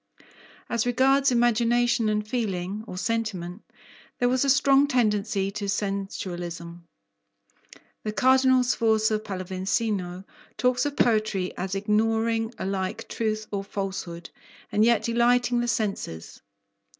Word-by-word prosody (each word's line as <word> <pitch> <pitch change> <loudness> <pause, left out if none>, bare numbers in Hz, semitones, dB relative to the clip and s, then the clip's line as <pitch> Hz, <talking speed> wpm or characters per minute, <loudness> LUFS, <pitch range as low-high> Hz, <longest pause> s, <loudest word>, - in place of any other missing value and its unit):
As 235 0 -1
regards 270 +2 +3
imagination 240 -1 +2
and 210 0 -1
feeling, 210 -4 -3
or 180 - -7
sentiment, 200 -4 -3 0.6
there 245 - +2
was 255 +1 +2
a 280 - +1
strong 275 +1 +5
tendency 210 -6 +1
to 200 0 -4
sensualism. 175 -4 -4 1.1
The 215 - -3
Cardinal 260 +1 +4
Sforza 220 -3 +2
Pallavicino 190 -1 -3 0.3
talks 250 +2 +2
of 285 - -6
poetry 215 -5 +1
as 190 +2 -3
ignoring 225 +2 +1
alike 195 +3 -3
truth 215 -1 -2
or 200 -1 -2
falsehood 190 -4 -5 0.4
and 210 +1 +3
yet 230 -2 +3
delighting 240 +1 +2
the 240 - -1
senses. 200 - -3
215 Hz, 115 wpm, -26 LUFS, 195-240 Hz, 1.1 s, strong